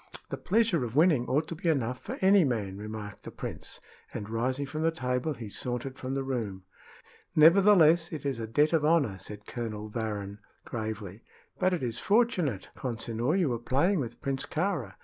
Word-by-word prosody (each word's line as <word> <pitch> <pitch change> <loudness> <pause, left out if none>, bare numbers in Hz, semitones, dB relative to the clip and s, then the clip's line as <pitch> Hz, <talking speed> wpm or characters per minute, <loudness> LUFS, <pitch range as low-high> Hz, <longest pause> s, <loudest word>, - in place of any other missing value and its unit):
"The - - -3
pleasure 210 - +2
of 120 0 -5
winning 150 -6 +4
ought 150 +4 +1
to - - -3
be 165 +1 -1
enough 125 -5 0
for - - -6
any 190 0 +6
man," 110 -9 -1
remarked 105 0 -7
the - - -7
prince, - - -6 0.3
and, 105 +1 -6
rising 130 +5 0
from 155 +3 -5
the 165 - +3
table, 130 -1 -1
he 115 -2 -7
sauntered 125 +5 -3
from 130 +1 -3
the 135 - -1
room. 110 -8 -3 0.7
"Nevertheless, 170 0 +6
it 150 -4 -6
is 135 -4 -1
a 110 - -4
debt 150 +8 +2
of 160 -2 +3
honor," 150 -11 +2
said 105 +1 -9
Colonel 110 -3 -5
Varrin, 105 -3 -4 0.3
gravely. 110 -3 -5 0.4
"But 185 0 +3
it 165 - -5
is 115 -2 -2
fortunate, 185 - +1
Consinor, 120 +4 -1
you 175 -7 +2
were 120 -2 -1
playing 145 - +2
with 120 -4 -5
Prince 135 -1 -2
Kāra. 155 - -2
130 Hz, 185 wpm, -29 LUFS, 110-160 Hz, 0.7 s, any